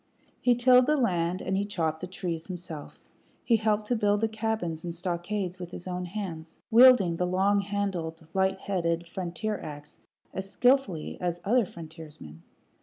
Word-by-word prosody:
He 245 -1 +4
tilled 250 +1 +6
the 305 0 +3
land, 180 -7 0
and 190 - -1
he 195 - +1
chopped 160 -6 -1
the 180 - -5
trees 175 -3 -4
himself; 175 -5 -8 0.4
he 230 - +4
helped 215 -1 +1
to 245 - 0
build 205 -1 +2
the 225 - +3
cabins 220 -7 -2
and 170 -1 -4
stockades 180 +2 -3
with 175 -1 -6
his 180 - -8
own 180 0 -3
hands, 175 -4 -6
wielding 225 -8 +7
the 180 - 0
longhandled, 195 -3 0
light 190 0 +1
headed 170 -3 -1
frontier 190 +4 -3
ax 150 0 -9 0.3
as 190 +1 -5
skilfully 245 - +1
as 175 -1 -1
other 235 +2 +3
frontiersmen. 155 - -11
185 Hz, 160 wpm, -28 LUFS, 170-210 Hz, 0.4 s, wielding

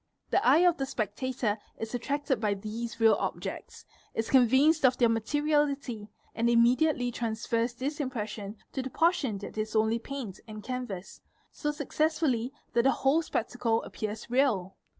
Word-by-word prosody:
The - - +3
eye 345 +3 +6
of 345 -1 +4
the 270 - -2
spectator 220 -1 -2 0.2
is 225 +1 -5
attracted 270 0 -1
by 210 -2 +1
these 225 +3 -6
objects, 225 -1 0 0.3
is 225 - -2
convinced 270 +5 +5
of 255 -1 +5
their 235 -2 +4
materiality, 275 -1 0 0.2
and 235 +1 +1
immediately 245 +2 +3
transfers 230 +1 -2
is 290 +3 -2
impression 215 -6 -4 0.2
to 265 - -1
the 260 - -5
portion 290 - +1
that 205 +2 -7
is 215 +1 -3
only 220 +1 +2
paint 240 -6 -6
and 215 -1 -8
canvass, 245 -7 -5 0.3
so 295 - -2
success 305 +1 0
fully 255 -6 0 0.2
that 235 - +4
the 265 - +4
whole 275 +5 +2
spectacle 235 -5 -1
appears 215 0 -5
real. 235 -8 +1
240 Hz, 150 wpm, -29 LUFS, 220-275 Hz, 0.3 s, eye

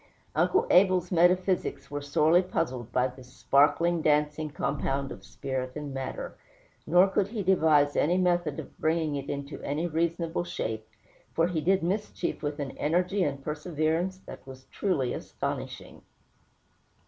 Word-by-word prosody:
Uncle 405 +5 +2
Abel's 185 -1 +4
metaphysics 180 -1 +2
were 145 0 -3
sorely 155 +4 +3
puzzled 130 -10 -3
by 125 - +2
this 130 0 -13
sparkling, 160 +6 +3
dancing 150 0 +1
compound 140 -1 -2
of - - -9
spirit 130 -2 -4
and 145 -2 -5
matter; - - -5 0.5
nor 180 +2 +6
could 195 0 +1
he 210 -1 -4
devise 155 -6 +4
any 175 +4 +2
method 175 -5 +1
of - - -10
bringing 160 -1 +1
it 140 0 -5
into 140 +1 -5
any 150 +4 -2
reasonable 170 +1 -1
shape, 110 -9 -4 0.5
for 165 - +3
he 165 -3 -1
did 190 +3 +2
mischief 190 0 -2
with 145 0 -3
an 140 -2 -3
energy 180 +5 +1
and 140 -3 -2
perseverance 160 +4 -1
that - - -9
was 130 0 -11
truly 145 -11 0
astonishing. - - -5
160 Hz, 145 wpm, -28 LUFS, 140-180 Hz, 0.5 s, nor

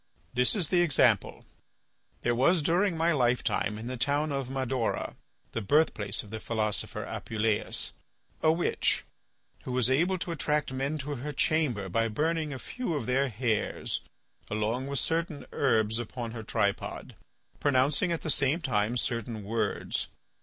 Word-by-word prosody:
"This 125 - +3
is 180 -7 0
the 180 -2 +4
example. 130 - +3 0.8
There 120 - +2
was 150 +7 +3
during 175 +2 +2
my 165 +1 +3
lifetime 125 -5 +1
in 110 - -7
the 125 +1 -4
town 145 +4 +1
of 135 -2 -2
Madaura, 130 -3 -1 0.4
the 115 - -2
birthplace 105 -4 +2
of 105 - -13
the 110 - -4
philosopher 110 -2 -2
Apuleius, 110 -1 -1 0.5
a 155 - +5
witch 170 +2 +1 0.6
who - - -6
was 125 0 +2
able 175 +8 +3
to 175 -1 -3
attract 150 -3 0
men 135 +4 -1
to 145 0 -4
her 145 +5 -4
chamber 145 - +1
by 115 +5 +1
burning 155 +6 0
a 135 - -4
few 235 - -3
of 140 - -2
their 135 +3 +2
hairs 110 -1 -1 0.5
along 110 +5 -1
with 140 0 -2
certain 165 0 -1
herbs 110 -4 +2
upon 120 0 -5
her 115 -1 -6
tripod, 100 -2 -2 0.4
pronouncing 140 +5 +3
at 165 - -1
the 155 - +1
same 140 +4 +2
time 115 -5 0
certain 115 -2 -2
words. 110 +3 -1
130 Hz, 155 wpm, -29 LUFS, 115-155 Hz, 0.8 s, a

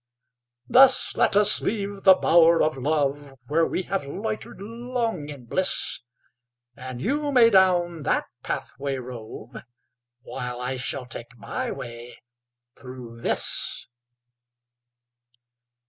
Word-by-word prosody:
Thus 260 +1 +5
let - - +2
us 205 0 +6
leave 200 -2 -4
the 190 -1 +9
bower 170 -1 +4
of 155 - 0
love, 140 0 -2
Where 160 +4 +1
we 185 - -3
have 190 -6 -3
loitered 215 +9 -5
long 230 -6 -4
in 140 -4 -10
bliss; 185 +10 +1 0.8
And 130 -1 -8
you 285 - -1
may 235 -4 +5
down 175 -4 +3
that - - 0 0.2
pathway 140 +2 -4
rove, 120 -3 -9 0.7
While 125 0 -6
I 125 +1 -3
shall 130 +1 -4
take 120 0 -10
my - - -4
way 120 +1 -8 0.6
through 125 -2 -11
this. - - +1
155 Hz, 115 wpm, -24 LUFS, 125-200 Hz, 0.8 s, the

